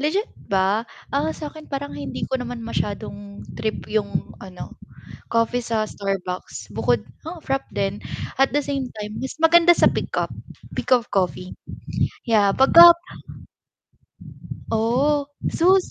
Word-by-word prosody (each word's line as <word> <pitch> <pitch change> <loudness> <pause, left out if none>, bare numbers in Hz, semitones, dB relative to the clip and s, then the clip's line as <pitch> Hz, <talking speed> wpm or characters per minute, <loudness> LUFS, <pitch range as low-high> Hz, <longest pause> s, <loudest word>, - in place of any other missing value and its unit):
Legit 345 +9 +1 0.2
ba? 195 +3 +1 0.2
Ah, 285 +3 +1
sa 300 -2 -6
'kin 310 -1 -12
parang 280 0 -4
hindi - - -4
ko 260 -1 -2
naman 245 -1 -5
masyadong 205 -2 -4
trip 220 -1 -3
yung 215 -2 -1
ano, 185 -2 -9 0.6
coffee 230 +1 +1
sa 225 -2 0
Starbucks 195 - -4
bukod 110 +2 +1 0.2
oo 330 +1 -7
frappe 270 -1 -2
din 195 +1 -1 0.4
at 270 -1 +3
the 290 - +3
same 275 -1 -2
time 210 0 -6
mas 265 - -4
maganda 340 +1 +7
sa - - +5
pick - - -4
up, - - 0 0.5
pick 255 - +2
up 245 -1 +2
coffee. 185 -1 -1 0.7
Yeah, 205 -3 +4
'pag 265 +4 +4
ka 345 0 +12 1.8
Oh, 265 +6 +2 0.2
Zeus, 370 +2 +3
235 Hz, 140 wpm, -23 LUFS, 200-285 Hz, 1.8 s, ka